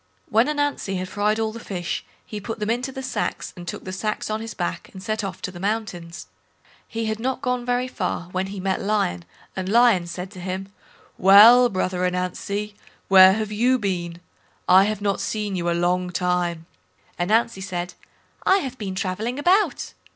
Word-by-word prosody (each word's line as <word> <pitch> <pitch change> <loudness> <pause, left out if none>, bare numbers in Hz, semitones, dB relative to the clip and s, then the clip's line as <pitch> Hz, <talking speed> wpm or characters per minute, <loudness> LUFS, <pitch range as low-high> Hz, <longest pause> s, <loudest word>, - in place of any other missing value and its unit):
When 225 +4 +4
Ananzi 290 -9 -1
had 185 0 -4
fried 210 +2 0
all, 220 -1 0
the 230 - -8
fish, 180 -6 -4 0.2
he 210 -1 -7
put 225 +2 -5
them 210 +1 -1
into 250 +3 -2
the 265 0 -7
sacks, 255 - -3
and 175 -1 -10
took - - -5
the 185 - -6
sacks 215 +2 -3
on 215 +1 -2
his 225 -1 -7
back 175 - -4
and 190 -1 -10
set 215 0 -2
off 195 - -6
to - - -3
the 175 - -10
mountains. 195 -5 -3 0.6
He 225 -1 -3
had 220 0 -2
not 260 +3 -2
gone 250 -1 -1
very 245 +1 +1
far 185 -7 -3
when 185 +1 -1
he 195 0 -6
met 190 0 -1
Lion, 195 - 0 0.3
and 190 0 -3
Lion 225 -6 +4
said 180 +2 -6
to 185 - -11
him": 190 +2 -5 0.5
"Well, 225 +6 +8
brother 185 -2 -1
Ananzi, 185 +3 -2 0.4
where 190 -1 +9
have 215 0 -2
you 245 +5 +3
been? 175 -5 -3 0.5
I 190 +2 +7
have 210 -1 -2
not 200 -1 0
seen 210 -2 -2
you 175 -1 -1
a 170 - +1
long 180 +1 +1
time." 180 -2 -1 0.5
Ananzi 215 +3 +1
said, 180 -2 -4 0.5
"I 380 - +5
have 260 -8 -5
been 195 -3 -4
travelling 205 +7 -2
about." 365 +8 +2
200 Hz, 190 wpm, -23 LUFS, 180-225 Hz, 0.6 s, where